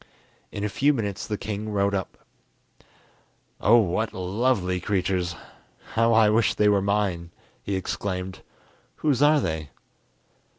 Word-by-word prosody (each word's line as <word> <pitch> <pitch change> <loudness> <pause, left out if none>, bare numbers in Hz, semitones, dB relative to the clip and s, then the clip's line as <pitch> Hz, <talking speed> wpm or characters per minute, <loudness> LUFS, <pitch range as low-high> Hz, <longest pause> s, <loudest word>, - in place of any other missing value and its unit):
In 100 - -5
a - - +1
few 140 +8 +2
minutes 105 -3 -3
the 105 - -2
king 105 +1 -5
rode 100 -1 +1
up. 95 -2 -3 1.4
"Oh, 115 +4 +5
what 110 +1 0
lovely 95 0 0
creatures! 90 -2 -1 0.6
how 115 +1 +3
I 110 -1 +5
wish 110 +2 +2
they 105 - +3
were 100 -1 +3
mine!" 100 -4 -1 0.3
he 100 - -3
exclaimed. 95 0 -4 0.6
"Whose 145 -4 +1
are 150 +1 +5
they?" 80 - -3
100 Hz, 130 wpm, -25 LUFS, 95-110 Hz, 1.4 s, Oh